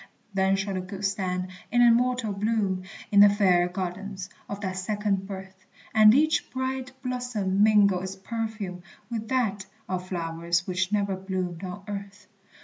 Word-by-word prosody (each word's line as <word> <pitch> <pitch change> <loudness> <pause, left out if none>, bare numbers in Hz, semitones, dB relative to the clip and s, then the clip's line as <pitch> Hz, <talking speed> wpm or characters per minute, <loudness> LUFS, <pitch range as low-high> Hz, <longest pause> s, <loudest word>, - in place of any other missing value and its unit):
Then 190 0 +3
shall 195 0 -2
the 185 - -2
good 190 +2 -5
stand 185 -2 -1 0.2
in 245 +1 +5
immortal 240 -2 +3
bloom, 200 -2 0 0.3
In 200 - +5
the 205 0 +10
fair 185 -4 +3
gardens 190 +1 -5 0.2
of 200 - -4
that 185 -2 -3
second 200 0 -1
birth; 190 -1 -9 0.3
And 215 +1 +8
each 310 +3 +2
bright 260 -1 -3
blossom 245 -7 -1
mingle 205 -3 +5
its 190 +1 -5
perfume 210 -3 -4 0.3
With 225 -1 -3
that 215 -6 0 0.2
of 185 0 -3
flowers 170 0 -1
which 185 +1 -1
never 200 -2 +1
bloomed 185 -2 -4
on 185 +1 -6
earth. 200 -1 -7
195 Hz, 150 wpm, -27 LUFS, 185-215 Hz, 0.3 s, the